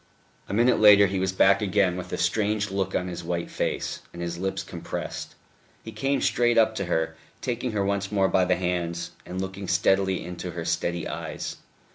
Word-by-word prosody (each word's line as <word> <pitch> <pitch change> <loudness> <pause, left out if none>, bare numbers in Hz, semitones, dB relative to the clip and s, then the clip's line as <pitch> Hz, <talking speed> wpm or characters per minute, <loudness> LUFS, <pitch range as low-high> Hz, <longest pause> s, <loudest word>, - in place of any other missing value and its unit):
A - - -3
minute 120 +2 +4
later 105 -1 +8
he 95 0 -1
was 95 0 0
back 95 - +4
again, 95 -2 +2
with 90 - -6
a - - -2
strange 105 +3 0
look 95 -1 -1
on 90 - 0
his 90 -1 -5
white 85 0 -3
face, - - -2
and 85 - -10
his 85 0 -4
lips 95 +1 -2
compressed. - - -6 0.5
He 110 - -7
came 135 +6 0
straight 120 -1 +2
up 110 -1 +5
to 100 - -1
her, 80 -2 -1 0.2
taking 125 -1 -2
her 100 -2 0
once 100 0 -1
more 100 -2 +3
by 95 -1 +3
the 90 0 +2
hands, 85 -1 -2 0.2
and 90 +1 -5
looking 95 0 -5
steadily 95 0 +2
into 90 0 -6
her 85 -1 -5
steady 85 0 -1
eyes. - - -5
95 Hz, 195 wpm, -26 LUFS, 90-105 Hz, 0.5 s, later